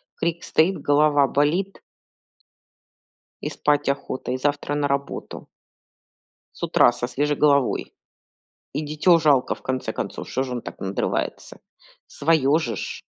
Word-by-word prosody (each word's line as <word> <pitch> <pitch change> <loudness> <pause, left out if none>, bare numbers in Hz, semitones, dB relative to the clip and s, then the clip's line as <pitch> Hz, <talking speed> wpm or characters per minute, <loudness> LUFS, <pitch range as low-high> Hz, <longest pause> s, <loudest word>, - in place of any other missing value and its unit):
крик 170 +1 -2
стоит, 180 +5 +2
голова 145 -1 +4
болит 165 +9 0 1.6
и - - -3
спать 145 -1 +1
охота, 135 -2 -3
и 130 - -1
завтра 145 +1 -1
на 145 -1 +1
работу. 140 0 -4 1.1
С - - -11
утра, - - +5
со 120 0 -4
свежей 145 +3 -1
головой. 140 -3 +2 0.8
И 150 - -2
дитё 155 +3 +3
жалко, 145 -5 +3
в - - -19
конце 130 0 -3
концов, - - -5
что 130 - -1
же 130 - -6
он 120 - -3
так - - -9
надрывается? 95 +1 -3 0.5
Своё 150 -1 +2
же 120 -9 -3
ж. - - -6
145 Hz, 135 wpm, -23 LUFS, 130-155 Hz, 1.6 s, утра